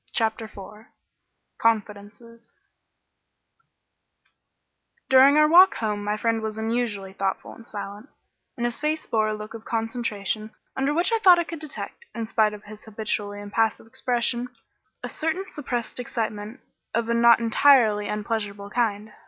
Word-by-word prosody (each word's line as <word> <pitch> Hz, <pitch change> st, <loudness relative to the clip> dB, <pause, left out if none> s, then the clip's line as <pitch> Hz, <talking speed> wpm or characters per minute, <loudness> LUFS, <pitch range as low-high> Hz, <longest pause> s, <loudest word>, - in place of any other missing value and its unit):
CHAPTER 225 Hz, -1 st, 0 dB
IV 210 Hz, +1 st, -12 dB, 0.7 s
CONFIDENCES 225 Hz, +1 st, -2 dB, 2.6 s
During 270 Hz, +2 st, +7 dB
our 305 Hz, 0 st, +6 dB
walk 360 Hz, +4 st, +7 dB
home 210 Hz, -2 st, -2 dB
my 210 Hz, +1 st, -1 dB
friend 225 Hz, 0 st, 0 dB
was 220 Hz, 0 st, -4 dB
unusually 220 Hz, -4 st, -2 dB
thoughtful 195 Hz, 0 st, -3 dB
and 230 Hz, -, -14 dB
silent, 205 Hz, +4 st, -7 dB, 0.5 s
and 240 Hz, -, -1 dB
his 240 Hz, -1 st, -2 dB
face 310 Hz, +1 st, -1 dB
bore 215 Hz, -1 st, +1 dB
a 215 Hz, -, -1 dB
look 210 Hz, +1 st, -8 dB
of 225 Hz, -1 st, -9 dB
concentration 225 Hz, -2 st, -3 dB, 0.2 s
under 270 Hz, +2 st, 0 dB
which 340 Hz, +8 st, +1 dB
I 455 Hz, -, +2 dB
thought 370 Hz, -4 st, +7 dB
I 345 Hz, -, +1 dB
could 330 Hz, -1 st, -7 dB
detect, 310 Hz, +9 st, -7 dB
in 230 Hz, -1 st, -3 dB
spite 215 Hz, -1 st, +1 dB
of 210 Hz, -, -14 dB
his 210 Hz, 0 st, -10 dB
habitually 210 Hz, -1 st, -3 dB
impassive 220 Hz, +2 st, -1 dB
expression, 245 Hz, 0 st, -1 dB, 0.6 s
a -, -, -2 dB
certain 325 Hz, +5 st, -2 dB
suppressed 250 Hz, -8 st, -4 dB
excitement 220 Hz, -1 st, -4 dB, 0.3 s
of 230 Hz, 0 st, 0 dB
a 235 Hz, -, +1 dB
not 235 Hz, 0 st, +6 dB
entirely 230 Hz, -3 st, +4 dB
unpleasurable 205 Hz, -1 st, -4 dB
kind. 215 Hz, -3 st, -1 dB
225 Hz, 145 wpm, -24 LUFS, 210-245 Hz, 2.6 s, During